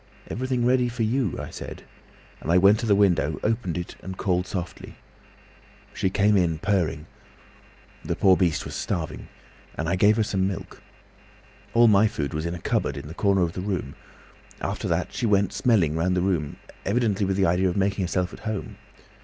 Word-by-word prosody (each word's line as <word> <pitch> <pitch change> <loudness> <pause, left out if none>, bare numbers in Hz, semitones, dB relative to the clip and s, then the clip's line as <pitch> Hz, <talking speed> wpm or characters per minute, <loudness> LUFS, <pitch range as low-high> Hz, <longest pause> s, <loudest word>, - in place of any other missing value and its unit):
'Everything 125 0 -1
ready 125 0 +3
for 120 -1 -2
you,' 115 -2 0
I - - -6
said, - - -8 0.6
and 85 +3 +2
went 100 +3 +5
to 115 - -2
the 100 - +5
window, 85 -7 +2
opened 110 -6 -1
it, 90 - -6
and 95 0 -7
called 90 -1 0
softly. 90 -2 -6 1.0
She 95 - 0
came 105 +2 +3
in, 85 -4 +2
purring—the 85 -5 -5
poor 95 -1 +5
beast 85 -5 0
was - - -7
starving—and 80 -2 -6
I 85 - +1
gave 105 +4 +4
her 110 - +3
some 95 -2 0
milk. 95 -3 -6 0.9
All 120 0 +7
my 105 0 +5
food 75 -9 -3
was 80 +2 -2
in 85 - -3
a - - -7
cupboard - - -1
in - - -7
the - - -7
corner 100 0 +2
of 85 -1 -1
the 90 - -4
room. 90 -8 -3 0.7
After - - -3
that - - -1
she 120 - -1
went 100 -2 +2
smelling 95 -11 +2
round 90 +3 +1
the - - +2
room, 85 -6 -1 0.3
evidently 105 -2 +1
with 95 0 0
the 95 - +3
idea 90 +2 +2
of 90 - -3
making 100 0 +1
herself 90 0 -1
at - - -10
home. 110 -2 -5
95 Hz, 185 wpm, -25 LUFS, 85-105 Hz, 1.0 s, All